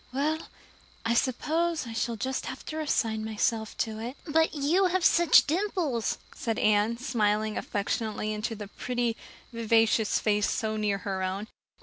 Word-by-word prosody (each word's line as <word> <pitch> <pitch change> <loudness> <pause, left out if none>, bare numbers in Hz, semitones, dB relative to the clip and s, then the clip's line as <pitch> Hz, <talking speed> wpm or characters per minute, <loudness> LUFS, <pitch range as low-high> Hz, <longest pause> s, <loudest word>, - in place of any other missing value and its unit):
Well, 295 +4 0 0.7
I 230 - +2
suppose 310 +6 0
I 230 - -7
shall 230 +1 -1
just 260 +4 -3
have 260 - -7
to 310 - -5
resign 225 -8 0
myself 220 0 -1
to 220 -1 -7
it." 240 +5 -6
"But 320 0 +2
you 310 +7 +2
have 365 -1 0
such 340 -1 +6
dimples," 320 - 0 0.2
said 225 -1 -3
Anne, 215 -1 +3
smiling 215 -4 0
affectionately 215 +1 -2
into 215 +2 -3
the 205 -1 -7
pretty, 240 +2 -2 0.4
vivacious 225 -1 +3
face 210 -1 +1
so 220 -1 -1
near 210 -2 0
her 190 -2 -2
own. 190 +2 -2
230 Hz, 150 wpm, -28 LUFS, 215-285 Hz, 0.7 s, such